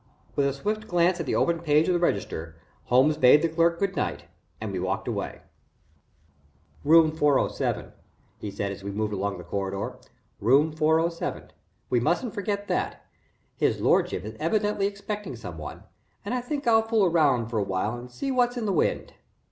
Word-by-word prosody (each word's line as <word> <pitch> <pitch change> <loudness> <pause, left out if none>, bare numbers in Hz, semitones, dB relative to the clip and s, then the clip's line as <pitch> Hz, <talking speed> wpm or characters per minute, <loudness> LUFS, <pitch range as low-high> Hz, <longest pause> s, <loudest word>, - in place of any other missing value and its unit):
With 140 -1 +2
a 140 - 0
swift 215 +9 -3
glance 175 +1 +2
at 165 - -3
the - - 0
open 170 -1 +2
page 155 -1 +3
of 180 - +3
the 175 - +2
register, 85 - -2 0.3
Holmes 135 +5 +4
bade 130 +5 +6
the - - +4
clerk 170 +1 +2
good 195 +1 -1
night - - -2 0.4
and 110 -2 -4
we 95 - -3
walked 95 +1 -2
away. - - -4 1.4
"Room 160 +1 +6
407," 150 -3 0 0.5
he 105 - -5
said, 100 0 -3
as 100 0 -8
we 100 - -4
moved 105 +1 -2
along 100 0 -2
the 90 - -9
corridor. 95 +2 -4 0.4
"Room 140 +9 +4
407 160 +2 0 0.4
we 125 - +4
mustn't 175 - 0
forget 205 -1 -3
that. 180 - -2 0.5
His - - +1
lordship 90 - +2
is 110 +1 -7
evidently 205 +4 +1
expecting 205 - -5
some 90 -9 -8
one, 75 - -8 0.4
and 205 - -2
I 250 - 0
think 280 +3 -4
I'll 225 -1 +5
fool 225 -2 +2
around 145 -9 +2
for 115 -2 -1
a - - +1
while 100 +4 -1
and 120 +1 -9
see 270 - -4
what's 245 -1 +1
in 230 - -2
the 200 - 0
wind." 160 - 0
155 Hz, 180 wpm, -26 LUFS, -, 1.4 s, bade